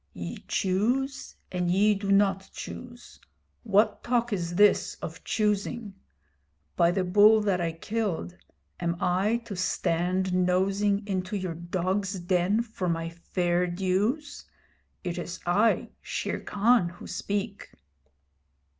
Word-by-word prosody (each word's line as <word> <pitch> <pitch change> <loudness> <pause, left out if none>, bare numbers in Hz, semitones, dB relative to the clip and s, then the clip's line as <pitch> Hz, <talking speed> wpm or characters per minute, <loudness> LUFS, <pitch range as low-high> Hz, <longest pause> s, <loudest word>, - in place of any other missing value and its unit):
'Ye 85 -1 -7
choose 245 +9 0 0.2
and 180 -1 -1
ye 205 +4 +4
do 200 0 -2
not 195 -1 +3
choose! 245 -1 -9 0.4
What 210 -1 +2
talk 240 -1 +1
is 175 -3 -2
this 205 +2 +4
of - - -8
choosing? 210 0 -1 0.8
By 170 - +4
the 185 +2 +1
bull 210 +4 +6
that 195 -4 +1
I 165 -1 -1
killed, 195 -1 -3 0.4
am 170 -1 -1
I 190 +6 +2
to 205 - -6
stand 180 +1 0
nosing 195 +3 +2
into 190 0 -2
your 185 -3 -3
dog's 185 +3 -2
den 180 +5 +1
for 215 -6 -4
my 165 0 -1
fair 175 +1 -1
dues? 200 - -1 0.6
It 175 -1 -3
is 175 +1 -6
I, 205 +6 +2
Shere - - -3
Khan, 210 -2 +2
who 175 - -12
speak!' 205 0 -4
195 Hz, 125 wpm, -27 LUFS, 180-210 Hz, 0.8 s, bull